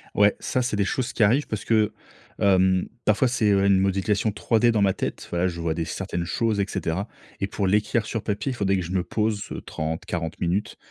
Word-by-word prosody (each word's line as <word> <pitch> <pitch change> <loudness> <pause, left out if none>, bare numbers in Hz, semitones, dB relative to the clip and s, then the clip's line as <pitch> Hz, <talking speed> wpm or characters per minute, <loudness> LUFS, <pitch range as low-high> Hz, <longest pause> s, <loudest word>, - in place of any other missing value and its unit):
Ouais, 105 0 +5
ça, 130 - -1
c'est 120 -3 -1
des 100 -1 +1
choses 125 +4 -2
qui 110 - +2
arrivent 125 +8 +3
parce 110 - -4
que, 110 -2 +3 0.5
hem, 95 -2 +3 0.2
parfois, 110 +5 +3
c'est 115 -3 +1
une 100 -1 +4
modification 95 +2 +1
3D 115 +3 +2
dans 110 -2 +1
ma 95 -1 +3
tête. - - -4
Voilà, 85 +1 +1
je 85 -2 -4
vois 85 -1 0
des 80 0 -2
certaines 85 +1 -3
choses, 110 +3 0
et 100 - +2
cetera, 90 +5 -2 0.3
et 100 - -1
pour 100 -1 -1
l'écrire 105 +3 +1
sur 115 -1 -3
papier, 110 +5 -2
il 125 - -4
faudrait 95 -3 +1
que 90 - -2
je 85 - -6
me 95 -1 +1
pose 105 0 -1 0.2
30-40 80 +1 -4
minutes. 95 +4 -1
100 Hz, 215 wpm, -24 LUFS, 95-110 Hz, 0.5 s, Ouais